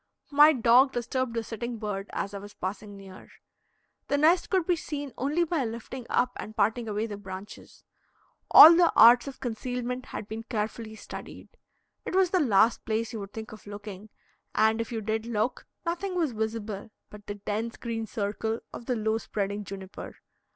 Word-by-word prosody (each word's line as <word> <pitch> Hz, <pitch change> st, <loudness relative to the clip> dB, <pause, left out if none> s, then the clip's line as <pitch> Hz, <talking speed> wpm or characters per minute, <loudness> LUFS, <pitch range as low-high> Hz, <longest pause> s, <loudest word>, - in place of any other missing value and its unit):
My 295 Hz, +2 st, +8 dB
dog 255 Hz, 0 st, +4 dB
disturbed 245 Hz, 0 st, -2 dB
the 230 Hz, -, -1 dB
sitting 235 Hz, +1 st, -5 dB
bird 205 Hz, -2 st, -4 dB
as 200 Hz, -, -4 dB
I 200 Hz, -, -5 dB
was 205 Hz, +1 st, -12 dB
passing 200 Hz, +2 st, -6 dB
near. 190 Hz, -1 st, -13 dB, 0.8 s
The 285 Hz, -, +1 dB
nest 330 Hz, +4 st, +3 dB
could 375 Hz, -4 st, +1 dB
be 355 Hz, -, +2 dB
seen 290 Hz, -4 st, -6 dB
only 295 Hz, +6 st, 0 dB
by 330 Hz, -4 st, -1 dB
lifting 235 Hz, +2 st, -6 dB
up 250 Hz, 0 st, +2 dB
and 215 Hz, -, -8 dB
parting 225 Hz, +3 st, +1 dB
away 210 Hz, +1 st, -1 dB
the 210 Hz, -3 st, -6 dB
branches. 195 Hz, 0 st, -10 dB, 0.7 s
All 330 Hz, +2 st, +11 dB
the 345 Hz, -1 st, +5 dB
arts 240 Hz, +4 st, +7 dB
of 275 Hz, -, -8 dB
concealment 250 Hz, +1 st, -4 dB
had 210 Hz, -, -6 dB
been 220 Hz, +1 st, -5 dB
carefully 220 Hz, 0 st, -4 dB
studied. 215 Hz, -, -10 dB, 0.5 s
It -, -, -4 dB
was 375 Hz, -2 st, +3 dB
the 370 Hz, -, +3 dB
last 230 Hz, -, +3 dB
place 225 Hz, +2 st, -2 dB
you 225 Hz, -, -4 dB
would 200 Hz, -1 st, -8 dB
think 220 Hz, 0 st, -7 dB
of 215 Hz, -1 st, -13 dB
looking, 205 Hz, 0 st, -9 dB, 0.5 s
and, 220 Hz, +1 st, +3 dB
if 230 Hz, -, -6 dB
you 225 Hz, -2 st, -3 dB
did 220 Hz, +1 st, -2 dB
look, 235 Hz, +2 st, -2 dB, 0.2 s
nothing 360 Hz, +3 st, -2 dB
was 325 Hz, -6 st, +1 dB
visible 220 Hz, -2 st, -4 dB, 0.2 s
but 210 Hz, -1 st, -13 dB
the 205 Hz, -, -4 dB
dense 215 Hz, +3 st, -4 dB
green 225 Hz, -2 st, -4 dB
circle 220 Hz, +2 st, -3 dB
of 235 Hz, -, -9 dB
the 250 Hz, -, +1 dB
low 220 Hz, 0 st, 0 dB
spreading 205 Hz, -1 st, -3 dB
juniper. 190 Hz, -1 st, -9 dB
225 Hz, 180 wpm, -27 LUFS, 210-255 Hz, 0.8 s, All